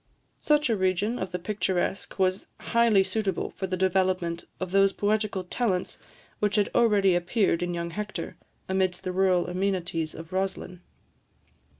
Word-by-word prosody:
Such 300 Hz, -1 st, +2 dB
a -, -, +3 dB
region 190 Hz, +4 st, 0 dB
of 185 Hz, -1 st, -4 dB
the 180 Hz, -, -2 dB
picturesque 190 Hz, 0 st, -2 dB
was 185 Hz, 0 st, +1 dB
highly 230 Hz, -4 st, +3 dB
suitable 195 Hz, 0 st, -2 dB
for 190 Hz, -, -4 dB
the 185 Hz, 0 st, -2 dB
development 185 Hz, -2 st, 0 dB
of 185 Hz, -1 st, -4 dB
those 195 Hz, 0 st, +4 dB
poetical 210 Hz, -2 st, 0 dB
talents 185 Hz, -1 st, -2 dB, 0.4 s
which 210 Hz, -1 st, +1 dB
had 205 Hz, -2 st, +2 dB
already 205 Hz, -5 st, +4 dB
appeared 175 Hz, 0 st, +1 dB
in 175 Hz, 0 st, -2 dB
young 170 Hz, 0 st, -3 dB
Hector, 210 Hz, +2 st, -5 dB, 0.3 s
amidst 190 Hz, -1 st, 0 dB
the 185 Hz, -, -2 dB
rural 185 Hz, -1 st, +2 dB
amenities 180 Hz, -3 st, -2 dB
of 165 Hz, +3 st, -10 dB
Roslin. 185 Hz, -1 st, -3 dB
190 Hz, 150 wpm, -27 LUFS, 180-205 Hz, 0.4 s, those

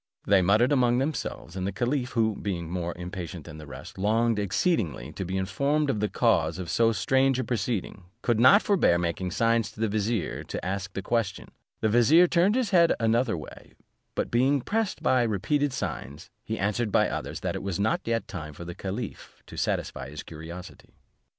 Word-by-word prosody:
They 100 Hz, -2 st, +5 dB
muttered 105 Hz, +8 st, +3 dB
among 125 Hz, -3 st, +3 dB
themselves, 135 Hz, -, -3 dB
and 95 Hz, 0 st, -2 dB
the -, -, -1 dB
caliph, 125 Hz, +5 st, -1 dB
who, 110 Hz, -3 st, +2 dB
being 85 Hz, -5 st, -4 dB
more 85 Hz, -1 st, -3 dB
impatient 90 Hz, -2 st, -6 dB
than 80 Hz, -, -10 dB
the 75 Hz, -, -10 dB
rest, 80 Hz, -, -10 dB
longed 110 Hz, +2 st, +2 dB
exceedingly 95 Hz, -, 0 dB
to -, -, -5 dB
be 95 Hz, +1 st, -3 dB
informed 140 Hz, +10 st, +1 dB
of 110 Hz, -, -2 dB
the 105 Hz, 0 st, 0 dB
cause 85 Hz, -9 st, +2 dB
of 90 Hz, -3 st, -5 dB
so 115 Hz, -1 st, +3 dB
strange 135 Hz, +3 st, +2 dB
a 130 Hz, -, 0 dB
proceeding, 110 Hz, -4 st, -3 dB, 0.2 s
could 120 Hz, -2 st, +2 dB
not 165 Hz, -, +7 dB
forbear 190 Hz, -, +3 dB
making 85 Hz, +1 st, -2 dB
signs 115 Hz, +2 st, +1 dB
to -, -, -16 dB
the 110 Hz, -, +1 dB
vizier 110 Hz, 0 st, -1 dB
to -, -, -5 dB
ask 95 Hz, 0 st, -3 dB
the 100 Hz, -, -4 dB
question: 115 Hz, -3 st, -1 dB, 0.3 s
the -, -, +3 dB
vizier 130 Hz, +10 st, +6 dB
turned 180 Hz, +5 st, +3 dB
his 255 Hz, -4 st, 0 dB
head 170 Hz, -3 st, +5 dB
another 115 Hz, -2 st, +2 dB
way; 75 Hz, -, -11 dB, 0.4 s
but -, -, -2 dB
being 130 Hz, +3 st, +3 dB
pressed 220 Hz, -, -2 dB
by 130 Hz, -1 st, +3 dB
repeated 125 Hz, +7 st, +1 dB
signs, 85 Hz, -, -5 dB
he 110 Hz, 0 st, -3 dB
answered 105 Hz, +3 st, 0 dB
by -, -, +4 dB
others, -, -, -4 dB
that -, -, -2 dB
it -, -, -4 dB
was 95 Hz, -2 st, -3 dB
not 110 Hz, +2 st, +1 dB
yet 115 Hz, 0 st, -1 dB
time 80 Hz, -6 st, -7 dB
for 85 Hz, -, -8 dB
the 85 Hz, -, -6 dB
caliph 100 Hz, +5 st, -6 dB
to -, -, -11 dB
satisfy 65 Hz, -, -2 dB
his 75 Hz, +1 st, -7 dB
curiosity. 85 Hz, +3 st, -10 dB
110 Hz, 195 wpm, -27 LUFS, 90-125 Hz, 0.4 s, not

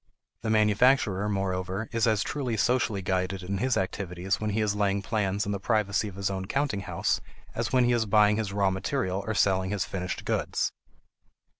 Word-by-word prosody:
The 115 Hz, -, -3 dB
manufacturer 105 Hz, -1 st, +3 dB
moreover 95 Hz, +1 st, -2 dB
is 115 Hz, 0 st, +1 dB
as 110 Hz, -3 st, +2 dB
truly 125 Hz, -6 st, -2 dB
socially 120 Hz, -4 st, +1 dB
guided 95 Hz, +1 st, -1 dB
in 95 Hz, +1 st, -3 dB
his 130 Hz, +3 st, +1 dB
activities 95 Hz, +1 st, -2 dB
when 110 Hz, -, -1 dB
he 105 Hz, +2 st, -1 dB
is 105 Hz, -1 st, +1 dB
laying 100 Hz, -1 st, +1 dB
plans 100 Hz, -1 st, 0 dB
in 100 Hz, -, -2 dB
the 100 Hz, -, -2 dB
privacy 105 Hz, -1 st, +1 dB
of 100 Hz, -, -8 dB
his 100 Hz, 0 st, -1 dB
own 95 Hz, -1 st, -4 dB
counting 135 Hz, -6 st, 0 dB
house 95 Hz, -, -1 dB, 0.3 s
as -, -, -2 dB
when 130 Hz, -1 st, +4 dB
he 120 Hz, -, +3 dB
is 115 Hz, -2 st, +1 dB
buying 105 Hz, 0 st, +4 dB
his 110 Hz, -3 st, -2 dB
raw 100 Hz, -1 st, +2 dB
material 95 Hz, -1 st, -2 dB
or 110 Hz, -, -1 dB
selling 95 Hz, -2 st, +2 dB
his 100 Hz, -2 st, -1 dB
finished 90 Hz, -1 st, -4 dB
goods. -, -, 0 dB
100 Hz, 190 wpm, -27 LUFS, 95-110 Hz, 0.3 s, when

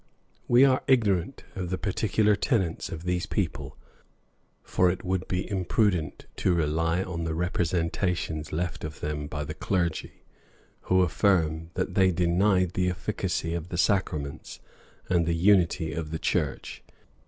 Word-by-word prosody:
We 125 Hz, +3 st, +6 dB
are 130 Hz, -1 st, +3 dB
ignorant 110 Hz, -3 st, +2 dB
of 90 Hz, -3 st, -4 dB
the 95 Hz, -, -1 dB
particular 105 Hz, +2 st, +1 dB
tenets 100 Hz, -, 0 dB
of 80 Hz, 0 st, -7 dB
these 90 Hz, +2 st, -1 dB
people; 95 Hz, -8 st, -3 dB, 0.9 s
for 90 Hz, -, +2 dB
it 90 Hz, -, -3 dB
would 95 Hz, -2 st, -2 dB
be 90 Hz, 0 st, -2 dB
imprudent 95 Hz, -3 st, 0 dB
to 90 Hz, -, +2 dB
rely 80 Hz, +3 st, +1 dB
on 85 Hz, -3 st, -4 dB
the 80 Hz, -1 st, -2 dB
representations 85 Hz, -2 st, -1 dB
left 85 Hz, +2 st, -3 dB
of 80 Hz, -1 st, -6 dB
them 75 Hz, -1 st, -3 dB
by 75 Hz, 0 st, -4 dB
the 75 Hz, +2 st, -5 dB
clergy, 85 Hz, -3 st, -2 dB, 0.7 s
who 95 Hz, 0 st, +5 dB
affirm, 80 Hz, -3 st, +1 dB
that -, -, -2 dB
they 95 Hz, -1 st, +4 dB
denied 90 Hz, +1 st, +2 dB
the 90 Hz, 0 st, 0 dB
efficacy 85 Hz, -1 st, -2 dB
of 85 Hz, 0 st, -4 dB
the 85 Hz, -, -4 dB
sacraments 80 Hz, -7 st, -1 dB, 0.5 s
and 85 Hz, -2 st, +2 dB
the 85 Hz, -, +1 dB
unity 85 Hz, -2 st, +3 dB
of 80 Hz, -2 st, -4 dB
the 80 Hz, -, -3 dB
church. -, -, -2 dB
90 Hz, 145 wpm, -27 LUFS, 80-95 Hz, 0.9 s, We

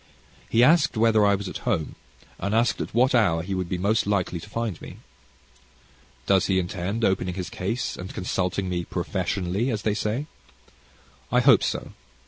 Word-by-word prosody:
He 115 Hz, +1 st, +4 dB
asked 155 Hz, -2 st, +4 dB
whether 110 Hz, -1 st, +4 dB
I 100 Hz, -, +4 dB
was 100 Hz, 0 st, -5 dB
at -, -, -6 dB
home, 80 Hz, -, -1 dB, 0.5 s
and 100 Hz, +3 st, -1 dB
asked 115 Hz, +2 st, +2 dB
at -, -, -5 dB
what 130 Hz, +3 st, +4 dB
hour 85 Hz, -9 st, +3 dB
he 95 Hz, +2 st, -4 dB
would 90 Hz, -2 st, -2 dB
be 90 Hz, -, -1 dB
most 100 Hz, +4 st, +1 dB
likely 95 Hz, -4 st, 0 dB
to 105 Hz, -, -12 dB
find 115 Hz, -4 st, -3 dB
me. -, -, -10 dB, 1.3 s
Does 95 Hz, -1 st, +3 dB
he 95 Hz, -, +2 dB
intend 95 Hz, +4 st, -1 dB
opening 90 Hz, -1 st, 0 dB
his 90 Hz, -2 st, -5 dB
case, 115 Hz, +7 st, -3 dB
and 90 Hz, +1 st, -7 dB
consulting 90 Hz, +1 st, -2 dB
me 90 Hz, -1 st, -2 dB
"professionally," 95 Hz, +5 st, -2 dB
as 110 Hz, -4 st, -2 dB
they 105 Hz, -, +1 dB
say? 110 Hz, +6 st, -2 dB, 1.1 s
I 125 Hz, -, +4 dB
hope 125 Hz, -3 st, +6 dB
so. -, -, -3 dB
100 Hz, 175 wpm, -25 LUFS, 90-115 Hz, 1.3 s, hope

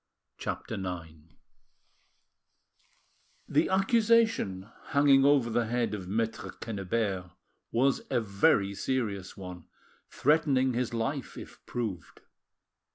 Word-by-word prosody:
CHAPTER -, -, -4 dB
IX 85 Hz, -3 st, -5 dB, 2.3 s
The -, -, +2 dB
accusation 210 Hz, -, +2 dB, 0.2 s
hanging 140 Hz, -2 st, +4 dB
over 140 Hz, -5 st, +4 dB
the 115 Hz, 0 st, +1 dB
head 120 Hz, -2 st, 0 dB
of 95 Hz, -4 st, -5 dB
Maitre 110 Hz, +3 st, -2 dB
Quennebert 100 Hz, -3 st, -2 dB, 0.4 s
was 130 Hz, +3 st, +2 dB
a -, -, +2 dB
very 100 Hz, -2 st, +2 dB
serious 100 Hz, -5 st, -3 dB
one, 90 Hz, -3 st, -8 dB, 0.4 s
threatening 135 Hz, -3 st, +2 dB
his 120 Hz, 0 st, -1 dB
life, 130 Hz, +5 st, -3 dB
if -, -, -11 dB
proved. 105 Hz, -9 st, -5 dB
115 Hz, 95 wpm, -29 LUFS, 100-135 Hz, 2.3 s, hanging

